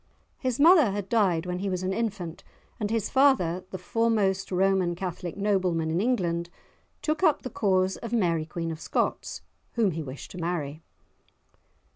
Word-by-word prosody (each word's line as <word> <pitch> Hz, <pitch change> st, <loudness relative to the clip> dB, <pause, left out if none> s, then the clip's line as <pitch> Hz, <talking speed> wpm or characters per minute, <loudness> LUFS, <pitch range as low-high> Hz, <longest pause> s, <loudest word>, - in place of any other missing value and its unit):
His 255 Hz, -2 st, -1 dB
mother 320 Hz, -, +7 dB
had 200 Hz, -1 st, -4 dB
died 185 Hz, -7 st, +2 dB
when 180 Hz, 0 st, -3 dB
he 200 Hz, +1 st, -2 dB
was 185 Hz, -1 st, -2 dB
an 185 Hz, +1 st, 0 dB
infant, 195 Hz, -7 st, -3 dB, 0.4 s
and 210 Hz, -2 st, -1 dB
his 225 Hz, -2 st, 0 dB
father, 225 Hz, -11 st, +3 dB
the 190 Hz, -, -5 dB
foremost 200 Hz, -1 st, 0 dB
Roman 185 Hz, -1 st, +2 dB
Catholic 175 Hz, -1 st, -5 dB
nobleman 185 Hz, -6 st, +1 dB
in 170 Hz, +3 st, +1 dB
England, 175 Hz, -8 st, 0 dB, 0.5 s
took 310 Hz, +2 st, 0 dB
up 315 Hz, -5 st, +3 dB
the 255 Hz, -, -5 dB
cause 190 Hz, -2 st, +1 dB
of 230 Hz, -, -7 dB
Mary 170 Hz, -9 st, +1 dB
Queen 165 Hz, 0 st, -3 dB
of 160 Hz, 0 st, -7 dB
Scots, -, -, -2 dB, 0.3 s
whom 225 Hz, -5 st, +2 dB
he 165 Hz, 0 st, -4 dB
wished 135 Hz, -2 st, -8 dB
to 180 Hz, -, -8 dB
marry. 160 Hz, -3 st, -3 dB
190 Hz, 165 wpm, -27 LUFS, 170-225 Hz, 0.5 s, mother